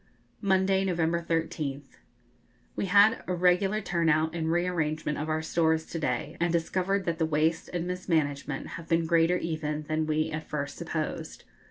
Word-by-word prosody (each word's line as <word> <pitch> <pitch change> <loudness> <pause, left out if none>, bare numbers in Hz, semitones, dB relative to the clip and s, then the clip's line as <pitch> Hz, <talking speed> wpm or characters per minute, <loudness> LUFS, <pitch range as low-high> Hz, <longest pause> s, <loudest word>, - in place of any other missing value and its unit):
Monday, 190 -1 +2
November 170 -2 0
13th. 160 -4 -3 0.8
We 195 - -1
had 205 +4 +5
a 180 - 0
regular 185 +4 +2
turn 170 -4 0
out 155 +1 +2
and 160 -1 -1
re 175 +1 +2
arrangement 155 -4 -1
of 155 +1 -3
our 155 0 0
stores 160 0 +1
to 165 - -5
day, 125 -6 -2
and 170 0 +1
discovered 185 +3 0
that 170 -1 -1
the 160 - +3
waste 160 +2 +1
and 175 -1 -2
mismanagement 155 -6 -1
have 165 0 -8
been 165 0 +2
greater 165 +1 +3
even 155 -3 -3
than 155 +1 -1
we 155 +1 0
at 155 +1 -5
first 145 -1 -3
supposed. - - -4
165 Hz, 170 wpm, -28 LUFS, 155-180 Hz, 0.8 s, had